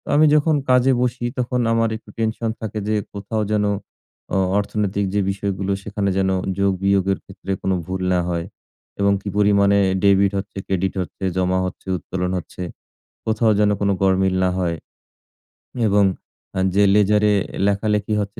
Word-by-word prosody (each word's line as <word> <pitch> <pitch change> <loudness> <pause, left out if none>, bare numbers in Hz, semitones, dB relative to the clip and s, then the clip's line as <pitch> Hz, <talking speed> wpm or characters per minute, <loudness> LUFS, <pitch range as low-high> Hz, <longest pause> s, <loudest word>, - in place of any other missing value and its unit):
আমি 155 - +6
যখন 150 +1 +3
কাজে 125 +1 +5
বসি 125 0 -1
তখন 125 0 0
আমার 115 -1 +2
একটু 115 - -20
টেনশন 115 0 -1
থাকে 110 -1 -4
যে, 110 - +1 0.2
কোথাও 105 +2 -3
যেন 105 -1 +2 0.7
অ - - +3 0.2
অর্থনৈতিক 100 -1 -1
যে 105 - +2
বিষয়গুলো, 100 0 -3
সেখানে 100 -1 -2
যেন 95 0 +2 0.3
যোগ-বিয়োগের 95 0 +2
ক্ষেত্রে 95 0 -8
কোন 95 - 0
ভুল 95 0 -4
না 90 - +2
হয়। 85 0 -2 0.5
এবং 100 0 +3
কি 100 - -5
পরিমাণে 100 -1 +4
এ - - 0
debit 100 0 +4
হচ্ছে, 100 0 -6
credit 95 0 0
হচ্ছে, 90 - -8
জমা 95 0 +1
হচ্ছে, 90 - -7
উত্তোলন 90 +3 -3
হচ্ছে, 90 +1 -7 0.6
কোথাও 110 0 +2
যেন 105 0 +4
কোন 100 - +1
গড়মিল 95 0 +3
না 90 - +2
হয়। 85 -2 0 1.1
এবং 100 0 +4 0.5
আ - - +1 0.2
যে 100 - +5
ledger 105 0 +3
এ - - +4 0.3
লেখালেখি 105 +1 0
হচ্ছে, 100 0 -6
100 Hz, 160 wpm, -21 LUFS, 95-105 Hz, 1.1 s, আমি